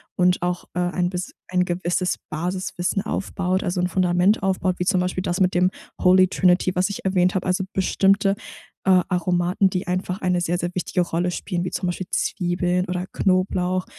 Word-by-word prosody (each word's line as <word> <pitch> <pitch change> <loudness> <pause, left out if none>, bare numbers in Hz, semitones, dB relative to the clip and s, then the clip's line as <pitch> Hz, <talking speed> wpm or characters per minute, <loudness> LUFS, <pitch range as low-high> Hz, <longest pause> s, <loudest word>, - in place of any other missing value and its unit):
und 180 0 +2
auch, 180 0 -2
äh, 180 - 0
ein 175 0 0
bis 180 0 -5
ein 180 0 +1
gewisses 180 0 -1
Basiswissen 180 +3 -2
aufbaut 190 -1 -2
also 180 0 -1
'n 180 - +1
Fundament 180 +3 +2
aufbaut, 190 -1 0
wie 180 - 0
zum 190 -1 +2
Beispiel 180 0 -2
das 175 -1 -1
mit 185 0 +3
dem 180 +1 +4 0.3
Holy 185 0 +6
Trinity, 185 0 +2
was 180 +2 +1
ich 200 - -6
erwähnt 185 -1 +2
habe. 185 - -1
Also 185 +1 +1
bestimmte, 195 +1 +2 0.5
äh, 185 -1 +5
Aromaten, 180 +1 +1
die 180 0 -3
einfach 185 +2 -2
eine 180 -1 +1
sehr, 175 0 0
sehr 175 - -1
wichtige 180 0 0
Rolle 175 +1 -1
spielen, 175 -1 -3
wie 180 - -3
zum 180 0 -2
Beispiel 175 +1 -3
Zwiebeln 180 0 0
oder 180 0 -3
Knoblauch, 185 -1 0
180 Hz, 185 wpm, -23 LUFS, 180-185 Hz, 0.5 s, Holy